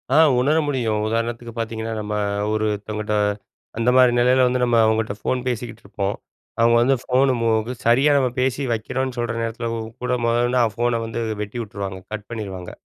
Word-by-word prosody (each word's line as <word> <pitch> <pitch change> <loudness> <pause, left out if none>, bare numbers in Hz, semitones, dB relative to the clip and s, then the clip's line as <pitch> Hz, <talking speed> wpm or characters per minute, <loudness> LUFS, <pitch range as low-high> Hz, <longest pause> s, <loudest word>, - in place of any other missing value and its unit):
ஆ - - +6 0.2
உணர 150 +5 +2
முடியும். 115 -7 0
உதாரணத்துக்கு 115 +1 -2
பார்த்தீங்கன்னா, 115 0 -3
நம்ம 105 0 -4 0.4
ஒருத்தவங்கட்ட 105 0 -2 0.6
அந்த 115 +2 +2
மாரி 125 -1 +6
நிலையில 125 +1 +4
வந்து, 125 0 0
நம்ம 120 -1 +3
அவங்கட்ட 110 -1 +1
ஃபோன் 125 +3 -1
பேசிக்கிட்டு 120 -1 -4
இருப்போம். 100 0 -2 0.4
அவங்க 115 0 +5
வந்து 135 +3 +3
ஃபோன 130 0 +2
மோகு 115 +1 +1
சரியா 135 +5 +4 0.3
பேசி 130 +2 0
வைக்கிறோம்ன்னு 130 +3 -3
சொல்ற 120 -1 -2
நேரத்தில 115 +1 -3 0.4
கூட 125 - 0
முதல்ல 120 +1 +2
இருந்து 125 0 +2
அ - - +4
ஃபோன 120 -1 0
வந்து 115 +1 -4 0.2
வெட்டி 115 +3 -5
உட்டுருவாங்க, 100 -2 -6
கட் 105 -1 -6
பண்ணிருவாங்க. 95 -6 -6
115 Hz, 165 wpm, -22 LUFS, 110-125 Hz, 0.6 s, ஆ